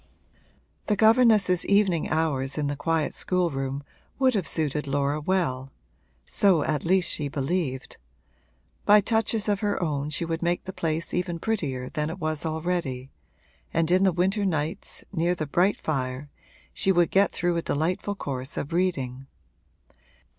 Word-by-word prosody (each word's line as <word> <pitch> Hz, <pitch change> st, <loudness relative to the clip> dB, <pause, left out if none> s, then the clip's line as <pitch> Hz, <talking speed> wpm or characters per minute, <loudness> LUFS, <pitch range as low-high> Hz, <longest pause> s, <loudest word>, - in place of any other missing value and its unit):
The 210 Hz, -, +2 dB
governess's 220 Hz, -5 st, +4 dB
evening 200 Hz, -5 st, +2 dB
hours 145 Hz, -4 st, 0 dB
in 150 Hz, -, 0 dB
the 145 Hz, 0 st, -1 dB
quiet 160 Hz, +1 st, 0 dB
schoolroom 140 Hz, -7 st, -1 dB, 0.3 s
would 260 Hz, -1 st, +3 dB
have 195 Hz, -7 st, -1 dB
suited 150 Hz, -2 st, -1 dB
Laura 140 Hz, +2 st, 0 dB
well 140 Hz, -7 st, -1 dB, 0.5 s
so 185 Hz, -, +3 dB
at 150 Hz, -3 st, -1 dB
least 180 Hz, +1 st, +2 dB
she 150 Hz, -, -2 dB
believed; 140 Hz, -1 st, -2 dB, 0.9 s
by 210 Hz, +1 st, +7 dB
touches 220 Hz, 0 st, 0 dB
of 205 Hz, -1 st, +1 dB
her 205 Hz, -2 st, -1 dB
own 150 Hz, -4 st, -1 dB
she 155 Hz, +3 st, 0 dB
would 165 Hz, 0 st, -3 dB
make 175 Hz, 0 st, 0 dB
the 190 Hz, -, -7 dB
place 165 Hz, 0 st, -2 dB
even 175 Hz, -1 st, -1 dB
prettier 150 Hz, -11 st, -2 dB
than 150 Hz, +2 st, -2 dB
it 165 Hz, -, -5 dB
was 155 Hz, -2 st, -2 dB
already, 155 Hz, -5 st, -3 dB, 0.6 s
and 165 Hz, 0 st, +1 dB
in 185 Hz, +1 st, +4 dB
the 190 Hz, -, +4 dB
winter 190 Hz, +5 st, +1 dB
nights, 165 Hz, 0 st, -2 dB
near 170 Hz, +2 st, +1 dB
the 155 Hz, -, -3 dB
bright 180 Hz, +7 st, +2 dB
fire, 135 Hz, -1 st, -3 dB, 0.4 s
she 195 Hz, -, +1 dB
would 175 Hz, -2 st, +3 dB
get 195 Hz, +1 st, +4 dB
through 175 Hz, 0 st, 0 dB
a -, -, 0 dB
delightful 180 Hz, +7 st, -1 dB
course 135 Hz, -6 st, -5 dB
of 145 Hz, -, -4 dB
reading. 135 Hz, -8 st, -1 dB
165 Hz, 155 wpm, -26 LUFS, 145-185 Hz, 0.9 s, by